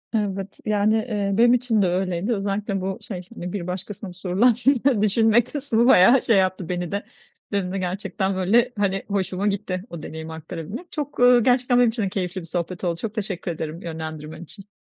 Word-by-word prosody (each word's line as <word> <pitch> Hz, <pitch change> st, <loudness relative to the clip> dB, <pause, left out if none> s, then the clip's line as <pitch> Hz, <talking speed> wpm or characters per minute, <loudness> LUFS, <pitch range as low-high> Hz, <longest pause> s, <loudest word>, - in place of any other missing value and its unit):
Evet, 200 Hz, -2 st, -2 dB
yani, 215 Hz, +1 st, +2 dB
eee, 210 Hz, -3 st, -1 dB
benim 240 Hz, +1 st, +6 dB
için 235 Hz, -4 st, +2 dB
de 185 Hz, -, +3 dB
öyleydi. 185 Hz, +4 st, 0 dB
Özellikle 200 Hz, -1 st, -2 dB
bu 190 Hz, 0 st, -3 dB
şey, 185 Hz, -4 st, -6 dB
hani, 175 Hz, +1 st, -6 dB
bir 185 Hz, -4 st, -4 dB
başkasına 190 Hz, +1 st, -6 dB
sorulan 195 Hz, +6 st, +2 dB, 0.5 s
düşünme 220 Hz, +2 st, +4 dB
kısmı 250 Hz, -3 st, 0 dB
bayağı 240 Hz, +4 st, +7 dB
şey 225 Hz, -4 st, +3 dB
yaptı 185 Hz, -2 st, 0 dB
beni 175 Hz, -1 st, -3 dB
de. 200 Hz, +1 st, -3 dB, 0.5 s
Benim 195 Hz, -3 st, -1 dB
de -, -, -1 dB
gerçekten, 190 Hz, +1 st, -2 dB
böyle, 230 Hz, +7 st, +3 dB
hani, 195 Hz, -1 st, 0 dB
hoşuma 195 Hz, 0 st, -1 dB
gitti 190 Hz, -2 st, -2 dB
o 165 Hz, -3 st, -8 dB
deneyimi 160 Hz, 0 st, -7 dB
aktarabilmek. 165 Hz, -, -7 dB
Çok, 290 Hz, -2 st, -5 dB
eee, 245 Hz, 0 st, +7 dB
gerçekten 245 Hz, +1 st, +3 dB
benim 245 Hz, -2 st, +5 dB
için 225 Hz, -1 st, -2 dB
de 195 Hz, -, 0 dB
keyifli 185 Hz, -1 st, -3 dB
bir 165 Hz, -, -10 dB
sohbet 175 Hz, +2 st, -4 dB
oldu. 170 Hz, -1 st, -1 dB
Çok 220 Hz, -2 st, -4 dB
teşekkür 195 Hz, -5 st, -3 dB
ederim 160 Hz, +1 st, -5 dB
yönlendirmen 160 Hz, -1 st, -6 dB
için. 195 Hz, +4 st, -12 dB
195 Hz, 185 wpm, -23 LUFS, 180-220 Hz, 0.5 s, bayağı